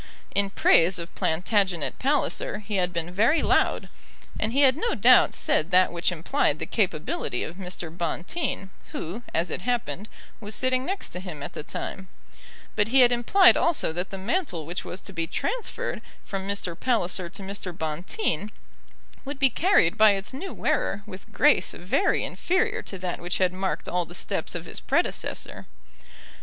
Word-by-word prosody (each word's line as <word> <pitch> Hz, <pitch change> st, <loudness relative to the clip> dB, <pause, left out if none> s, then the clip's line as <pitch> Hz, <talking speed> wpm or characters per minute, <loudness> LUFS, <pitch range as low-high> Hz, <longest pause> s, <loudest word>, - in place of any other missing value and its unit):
In 200 Hz, 0 st, +1 dB
praise 180 Hz, -1 st, +4 dB
of 170 Hz, 0 st, -7 dB
Plantagenet 180 Hz, 0 st, 0 dB
Palliser 275 Hz, -5 st, 0 dB
he 210 Hz, -1 st, -4 dB
had 180 Hz, -1 st, +1 dB
been 170 Hz, 0 st, -3 dB
very 225 Hz, -, +3 dB
loud, -, -, +2 dB, 0.5 s
and 220 Hz, -, 0 dB
he 275 Hz, +4 st, +2 dB
had 265 Hz, -2 st, +6 dB
no 465 Hz, +10 st, -1 dB
doubt -, -, +6 dB
said 155 Hz, -, +1 dB
that 185 Hz, 0 st, +5 dB
which 175 Hz, +1 st, 0 dB
implied 160 Hz, -3 st, 0 dB
the -, -, -4 dB
capability 165 Hz, -, -1 dB
of 170 Hz, -, -7 dB
Mr. 180 Hz, -3 st, -7 dB
Bonteen, 190 Hz, -, -3 dB, 0.2 s
who, 180 Hz, +9 st, -5 dB
as 170 Hz, +2 st, 0 dB
it -, -, -3 dB
happened, 230 Hz, -2 st, -2 dB, 0.3 s
was 210 Hz, -1 st, -3 dB
sitting 255 Hz, 0 st, +1 dB
next 390 Hz, +1 st, -3 dB
to 180 Hz, -, -6 dB
him 175 Hz, -6 st, -7 dB
at -, -, -6 dB
the -, -, -5 dB
time; 190 Hz, +5 st, -6 dB, 0.7 s
but 210 Hz, -1 st, +2 dB
he 260 Hz, +3 st, +5 dB
had 245 Hz, -1 st, +6 dB
implied 245 Hz, +11 st, +6 dB
also 335 Hz, -, +1 dB
that 180 Hz, +3 st, -3 dB
the 195 Hz, -, -6 dB
mantle 195 Hz, -, -1 dB
which 170 Hz, +3 st, -4 dB
was 185 Hz, -, -7 dB
to 195 Hz, -, -10 dB
be 165 Hz, -2 st, -2 dB
transferred -, -, -3 dB, 0.2 s
from 195 Hz, -1 st, -4 dB
Mr. 200 Hz, -4 st, -2 dB
Palliser 185 Hz, -6 st, 0 dB
to 195 Hz, +2 st, -9 dB
Mr. 195 Hz, -1 st, -5 dB
Bonteen 170 Hz, -, -3 dB, 0.7 s
would 285 Hz, +1 st, -6 dB
be 270 Hz, -2 st, +3 dB
carried 305 Hz, -, +3 dB
by 215 Hz, -1 st, +7 dB
its 195 Hz, +5 st, -4 dB
new 345 Hz, +9 st, -5 dB
wearer 200 Hz, +1 st, -1 dB
with 190 Hz, -3 st, -11 dB
grace -, -, +3 dB
very -, -, +1 dB
inferior 375 Hz, +5 st, 0 dB
to 195 Hz, -, -7 dB
that 180 Hz, -1 st, -4 dB
which 175 Hz, +1 st, -2 dB
had 185 Hz, -1 st, +2 dB
marked 190 Hz, +1 st, -2 dB
all 180 Hz, -1 st, 0 dB
the 175 Hz, -, -11 dB
steps -, -, -3 dB
of -, -, -5 dB
his -, -, -4 dB
predecessor. -, -, -2 dB
195 Hz, 175 wpm, -26 LUFS, 175-245 Hz, 0.7 s, by